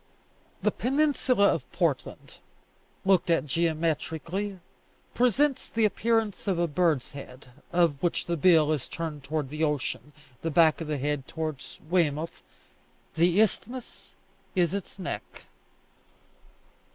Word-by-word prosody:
The - - +3
peninsula 265 -5 +2
of 140 - -2
Portland, 170 -6 -2 0.7
looked 190 -2 +3
at 165 -1 +3
geometrically, 165 +5 -1 0.6
presents 260 +3 +2
the 225 -1 +2
appearance 220 0 0
of 190 -3 +1
a 175 - +2
bird's 160 -4 +1
head, 135 -2 -11 0.2
of 170 -5 +2
which 175 - 0
the 170 - -1
bill 160 -1 +5
is 150 -5 -2
turned 160 -4 -5
towards 145 -1 -2
the 155 +1 -2
ocean, 150 -1 -2 0.3
the 165 - -1
back 160 +1 +4
of 160 - -4
the 150 -1 -1
head 145 0 -2
towards 155 -4 -5
Weymouth; 165 -2 0 0.7
the 175 +4 +3
isthmus 235 +4 -2 0.4
is 175 -2 +2
its 200 -1 -5
neck. 185 - -6
165 Hz, 125 wpm, -27 LUFS, 150-195 Hz, 0.7 s, bill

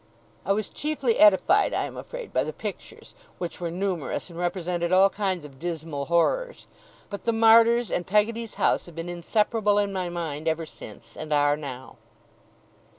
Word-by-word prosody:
I - - +2
was 210 +1 0
chiefly 285 -6 -1
edified, 210 - +5
I - - 0
am - - -6
afraid, - - -8
by - - +2
the - - -4
pictures, - - -8 0.2
which 175 0 -6
were 170 - -2
numerous, 180 -2 -3
and 170 - -9
represented 175 -1 -2
all 190 +1 +5
kinds 190 -6 -2
of 135 -2 -13
dismal 160 -4 -4
horrors; 485 - 0 0.5
but 200 - -7
the 230 - +3
Martyrs 230 0 +5
and 175 - -2
Peggotty's 220 +3 0
house - - +1
have 170 - -13
been 165 +1 -5
inseparable 210 +4 +1
in 200 -1 +1
my 185 -2 -2
mind 165 -3 -4
ever 160 0 0
since, 115 -5 -13
and 155 0 -7
are 145 0 +3
now. 130 -3 -8
180 Hz, 170 wpm, -25 LUFS, 165-215 Hz, 0.5 s, edified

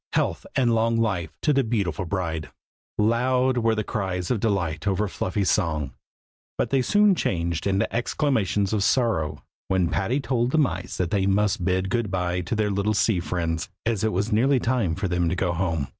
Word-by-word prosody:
Health - - 0
and 120 -3 +3
long 115 0 +2
life 95 -8 0
to 150 - +3
the 135 -1 +3
beautiful 100 -6 -1
bride! 85 -4 -3 0.5
Loud 125 +3 +2
were 115 -1 +2
the 110 - -1
cries 95 -3 -3
of 120 - +1
delight 95 -5 -1
over 100 +2 +1
Fluffy's 95 +1 -1
song; 80 -8 0 0.6
but - - -1
they 135 -1 +3
soon 205 +8 +4
changed 85 - -1
into 100 +2 0
exclamations 110 - 0
of 105 -2 +1
sorrow, 110 - +1 0.2
when 95 -3 +1
Patty 115 +8 0
told 125 -3 0
the 160 - 0
mice 110 - 0
that 90 -3 -1
they 95 -1 +1
must 100 -2 +1
bid 95 +1 0
good 120 -3 0
bye 90 -1 -1
to 90 +6 -3
their 105 -1 0
little 100 +2 0
sea 105 -2 +2
friends, 85 -2 -2 0.2
as 115 -3 0
it 110 - +2
was 100 +3 -1
nearly 130 +5 +3
time 115 -9 0
for 95 +2 -2
them 90 -1 0
to 90 - -1
go 90 -1 0
home. 80 -5 -1
100 Hz, 190 wpm, -24 LUFS, 90-115 Hz, 0.6 s, soon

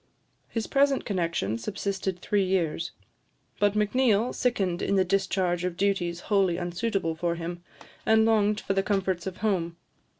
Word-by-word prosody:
His 225 -2 -2
present 275 0 +2
connexion 165 - -1
subsisted 195 - -3
three 205 -1 +1
years; 175 -3 0 0.7
but 205 0 +3
Macneill 220 +1 +2
sickened 195 -8 0
in 200 - +1
the 190 -1 +3
discharge 185 -2 0
of 180 -1 -2
duties 180 -4 0
wholly 195 -4 +2
unsuitable 175 0 -1
for 170 +1 -1
him, 170 +1 -6 0.4
and 220 0 +4
longed 215 -2 +3
for 195 - -2
the 195 - +2
comforts 190 -3 -1
of 185 - -5
home. 170 -5 0
195 Hz, 145 wpm, -27 LUFS, 175-210 Hz, 0.7 s, and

